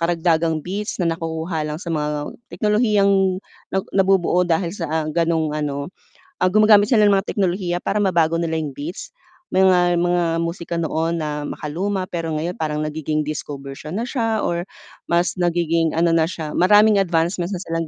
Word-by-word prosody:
karagdagang 165 -2 +1
beats 205 +4 -4
na 180 - -1
nakukuha 160 0 -3
lang 150 - -3
sa 170 -1 -5
mga 150 -1 -2 0.2
teknolohiyang 205 -4 +2 0.3
nag 190 +1 -1
nabubuo 190 -2 +3
dahil 170 0 0
sa 160 -5 -2
gano'ng 165 -2 +1
ano 145 +2 -3 0.5
ah, 185 - +2
gumagamit 215 -1 +6
sila 215 -4 +5
ng 200 - +4
mga 195 - -1
teknolohiya 180 -2 0
para 205 - -1
mabago 170 -5 +2
nila 160 -1 -1
'yung 145 -3 -5
beats 155 +6 -6 0.4
mga 180 -2 +4
mga 175 0 +2 0.2
musika 170 0 -4
noon 165 +1 -1
na 150 -1 -3
makaluma 185 +5 -3
pero 165 -3 -4
ngayon 165 +4 -2
parang 150 -1 -1
nagiging 155 0 -2
disco 150 -1 -5
version 140 +5 -7
na 230 - -2
siya 225 -4 -1
or 175 +2 -2 0.4
mas 170 +1 +2
nagiging 170 -2 +1
ano 170 0 +3
na 165 0 +2
siya 155 -4 -5
maraming 205 +2 +5
advancements 175 +1 0
na - - -8
silang 165 -2 -3
170 Hz, 165 wpm, -21 LUFS, 160-190 Hz, 0.5 s, gumagamit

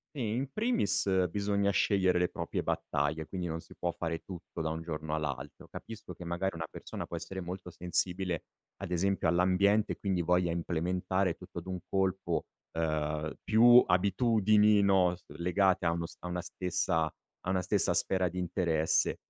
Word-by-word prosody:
Sì, 115 -6 -2
in 135 +2 -3
primis 100 - +2
bisogna 100 +1 +1
scegliere 95 -1 +2
le 90 - +2
proprie - - -3
battaglie 75 +2 -1
quindi 90 0 -4
non 80 0 -3
si - - -16
può 85 -1 -2
fare 80 -1 -3
tutto 90 -2 -9
da 80 - 0
un 80 +1 -3
giorno 80 -2 -4
all'altro. 75 -2 -5
Capisco 110 -1 -9
che 90 - -10
magari 90 +3 -1
una 80 -1 -4
persona - - -7
può - - -5
essere 95 0 -6
molto 90 0 -6
sensibile 90 0 -1 0.4
ad 95 - -5
esempio 95 +1 +1
all'ambiente 95 +5 +3
quindi 95 -3 -1
voglia 90 0 +2
implementare 90 +2 0
tutto 90 0 -9
d'un 95 0 -5
colpo, 95 -1 0 0.3
uhm, 75 -1 -1
più 120 +3 +7
abitudini, 105 +2 +4
no, 95 -3 +3
s 85 - -24
legate 90 +1 +2
a 85 - +3
uno 85 0 -2
st - - -9
a - - -3
una 90 0 -3
stessa 90 -2 0 0.4
a 95 - -1
una 95 -1 +1
stessa 95 -1 +1
sfera 95 +1 +2
di 90 +2 -6
interesse 85 -3 +1
90 Hz, 170 wpm, -31 LUFS, 85-100 Hz, 0.4 s, più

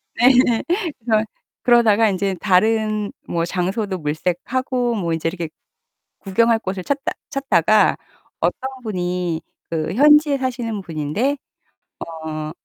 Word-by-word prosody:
네 240 - +2 0.2
예. 230 -2 +1 0.4
그래서 220 -1 +1 0.4
그러다가 225 -3 +5
인제 195 0 -1
다른 215 +1 +2 0.2
뭐 170 0 -1
장소도 190 +2 -2
물색하고 235 - -1
뭐 170 -5 -1
인제 165 0 -1
이렇게 170 -3 -5 0.7
구경할 225 +4 +2
곳을 190 -3 -4
찾다 280 +4 -1 0.2
찾다가 215 - +3 0.4
어떤 265 - -1
분이 180 -4 -2 0.3
그 160 +1 -2
현지에 295 +2 +5
사시는 240 -5 -3
분인데 170 - -1 0.7
어 155 -1 -5
205 Hz, 245 characters per minute, -20 LUFS, 175-235 Hz, 0.7 s, 그러다가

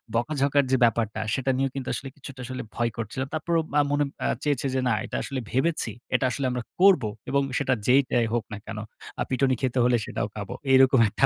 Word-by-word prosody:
বকাঝকার 140 +3 +2
যে 130 - +4
ব্যাপারটা, 115 -2 0
সেটা 135 0 +1
নিয়েও 135 -1 0
কিন্তু 135 -2 -4
আসলে 135 - -4
কিছুটা 135 -2 -9
আসলে 130 0 -5
ভয় 120 -1 +1
করছিল। 115 +4 -4
তারপরও 165 +1 +1 0.2
আ - - +6
মনে 145 0 +2 0.2
আ - - +2 0.2
চেয়েছে 145 -3 0
যে 130 - +2
না 120 - +3
এটা - - -4
আসলে 135 -2 -3
ভেবেছি। 135 -3 0 0.2
এটা - - +2
আসলে 140 +2 -2
আমরা 125 -1 -3 0.2
করব। 190 - +6 0.3
এবং 140 +1 +2 0.2
সেটা 130 -2 +1
যেইটাই 125 -3 +3
হোক 120 -2 +1
না - - -4
কেন। 105 - -6 0.4
আ - - 0
পিটুনি 130 0 +2
খেতে 130 -1 0
হলে 120 -1 +4
সেটাও 105 - -2
খাবো। 100 -2 -5 0.2
এরকম 130 -1 +6
একটা - - +2
130 Hz, 210 wpm, -26 LUFS, 120-140 Hz, 0.4 s, আ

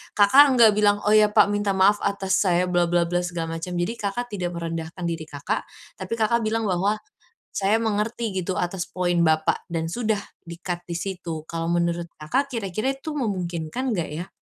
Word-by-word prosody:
Kakak 215 +8 +7
enggak 230 -3 +7
bilang, 205 -1 +3
"Oh 210 - +3
ya, 210 -1 +5
Pak, - - +6
minta 205 -1 0
maaf 200 +2 +5
atas 200 -1 0
saya 180 -2 +2
bla-bla-bla 175 0 +2
segala 165 -2 -4
macam". 180 +2 -5
Jadi, 175 +6 -1
Kakak 215 +4 -2
tidak 180 -3 -2
merendahkan 165 +1 -5
diri 165 -2 -3
Kakak, 145 -2 -3 0.3
tapi 190 +4 -4
Kakak 235 +2 +2
bilang 225 +1 0
bahwa, 195 +4 +1 0.6
"Saya 205 +3 +2
mengerti 225 +1 -1
gitu 185 +2 -2
atas 180 0 -2
poin 175 -1 0
Bapak", 155 0 +1
dan 165 -1 -1
sudah 220 -2 0 0.2
di-cut 175 +1 -6
di 170 - -4
situ. 175 -4 -5
Kalau 165 0 -3
menurut 170 0 0
Kakak, 270 - -1
kira-kira 215 +3 -1
itu 310 +3 -6
memungkinkan 195 - -2
enggak 170 -3 -2
ya? 170 +5 -6
185 Hz, 175 wpm, -24 LUFS, 170-210 Hz, 0.6 s, Kakak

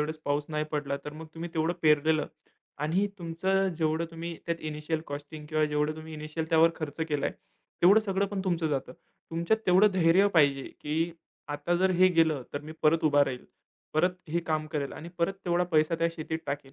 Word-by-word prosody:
वेळेस 155 +1 -2
पाऊस 145 +1 0
नाही 155 -1 -1
पडला 145 -2 -1
तर 150 - -6
मग 160 +1 -9
तुम्ही 170 +1 -6
तेवढं 160 +2 +1
पेरलेलं 155 0 +3 0.6
आणि 185 +6 +2
तुमचं 190 +3 0
जेवढं 160 +1 +1
तुम्ही 165 0 -6
त्यात 170 0 -2
इनिशिअल 150 +1 -3
कॉस्टिंग 145 +1 -7
किंवा 155 -1 +2
जेवढं 150 +1 0
तुम्ही 160 0 -9
इनिशिअल 155 +1 -4
त्यावर 165 0 +6
खर्च 155 -1 -6
केलाय 145 -2 0 0.5
तेवढं 195 +5 +7
सगळं 200 -2 0
पण 200 -1 -3
तुमचं 170 -4 0
जातं. 135 -3 -2 0.4
तुमच्यात 170 +7 +1
तेवढं 190 +3 +6
धैर्य 185 +2 +5
पाहिजे 140 -3 +4 0.2
की 160 +3 -1 0.4
आता 145 +4 -1
जर 185 +1 +3
हे 185 +1 +5
गेलं 160 -6 +2
तर 145 - -3
मी 155 +1 -8
परत 160 +1 +3
उभा 145 -1 +5
राहील, 125 -2 -5 0.5
परत 175 +4 +4 0.2
हे 170 +2 0
काम 155 -1 0
करेल 145 -3 -3
आणि 170 - -8
परत 170 +3 +2
तेवढा 175 0 +2
पैसा 155 +1 +3
त्या 165 0 +2
शेतीत 160 -1 -4
टाकेल. 140 -1 -4
160 Hz, 190 wpm, -29 LUFS, 150-170 Hz, 0.6 s, तेवढं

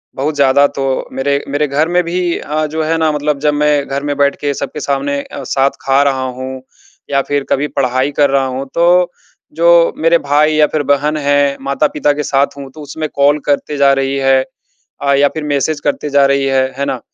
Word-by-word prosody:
बहुत 145 +3 -2
ज़्यादा 140 0 +4
तो 135 -1 -1
मेरे, 140 +2 -1
मेरे 145 +1 0
घर 150 +4 0
में 180 0 +2
भी 175 0 -1
अ, 155 +1 -2
जो 155 +1 -3
है 165 +1 0
ना 160 -1 +1
मतलब 150 -1 -1
जब 150 - +3
मैं 145 -1 +1
घर 140 +1 -3
में 145 -1 -2
बैठ 140 0 +2
के 145 -1 -1
सबके 150 - -5
सामने 140 0 -1
अ, - - -9
साथ 135 +1 +1
खा 135 +1 +2
रहा 135 -2 0 0.2
हूँ 130 0 -6 0.5
या 140 0 +2
फिर 145 -1 0
कभी 145 +2 0
पढ़ाई 130 +2 0
कर 140 - +4
रहा 135 -1 +2
हूँ 130 +1 -4
तो 175 +1 +3 0.5
जो 170 0 +5
मेरे 165 +1 +3
भाई 150 +2 +2
या 155 -1 +5
फिर 150 -1 -2
बहन 145 +2 +1
है, 145 -1 +1
माता-पिता 145 +2 0
के 150 +1 -3
साथ 140 +1 0
हूँ 140 -1 -8
तो 155 - -12
उसमें 155 +2 -5
कॉल 145 +2 +3
करते 145 0 -1
जा 140 -1 +4
रही 135 0 -1
है। 135 -1 +3 0.6
अ, 140 0 +2
या 140 +1 +4
फिर 155 - -6
मैसेज 145 +1 -1
करते 150 0 -2
जा 140 -1 +4
रही 140 0 +1
है। 135 -1 +1
है 140 - -1
ना? 130 -3 -3
145 Hz, 215 wpm, -15 LUFS, 140-150 Hz, 0.6 s, जो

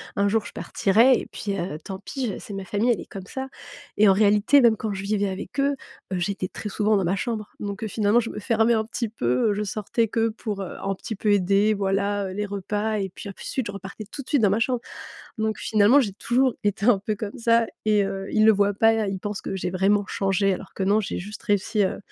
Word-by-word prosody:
un 200 0 +2
jour 215 +1 +1
je - - -8
partirais 230 +6 +3
et - - -5
puis, 200 -2 -3
heu, 170 -4 -4
tant 190 - -6
pis, 255 +6 -4
je 205 - -4
c'est 205 - -9
ma 195 - -4
famille, 205 +6 +1
elle 220 - 0
est - - -9
comme 190 -2 -7
ça 265 +6 -5 0.5
et 215 - +6
en 195 - +7
réalité, 210 +7 +4
même 230 -3 +5
quand 215 -1 -3
je 195 - -4
vivais 200 0 0
avec 190 +8 -6
eux, 280 +1 +3 0.4
heu, 185 - -1
j'étais 185 +1 -2
très 210 - -6
souvent 210 +1 +1
dans 195 - +2
ma 180 +3 +1
chambre. 215 0 -3
Donc, 200 +1 -5
heu, 220 - -1
finalement 210 +2 +2
je 230 - -3
me - - -8
fermais 225 +1 +2
un 220 0 0
petit 230 0 -3
peu, 125 - +1
heu, 205 - +2
je 210 - -1
sortais 215 +3 -1
que 225 +1 +1
pour, 215 -2 -5
heu, 190 - -6
un 195 0 -2
petit 220 +3 -6
peu 210 +1 0
aider, 200 +2 +3
voilà, 200 0 0
heu, - - -6
les 210 +2 -2
repas 205 +2 -2
et 195 -1 -2
puis 200 - -9
ensuite 220 +5 -4
je - - -4
repartais 200 +2 -8
tout 280 - -6
de 255 - -15
suite 275 -7 +2
dans 200 - +5
ma 215 - +2
chambre. 245 0 0 0.6
Donc 220 0 -1
finalement, 215 +6 +5
j'ai 210 -7 -1
toujours 250 +4 +1
été 205 0 0
un 245 -4 +6
peu 215 - 0
comme 205 0 -6
ça 230 0 +3 0.2
et 210 -2 +3
heu, 195 0 -4
ils 215 - +4
le 220 - +8
voient 205 0 +2
pas, 225 0 +3
ils 195 -1 -3
pensent 205 -1 -4
que - - -4
j'ai 185 -1 -2
vraiment 195 +2 +2
changé 195 0 +1
alors 190 - -9
que - - -3
non, 200 +3 +3
j'ai 200 - -4
juste 205 +4 -8
réussi, 205 +1 +1
heu, - - -2
205 Hz, 260 wpm, -24 LUFS, 195-220 Hz, 0.6 s, le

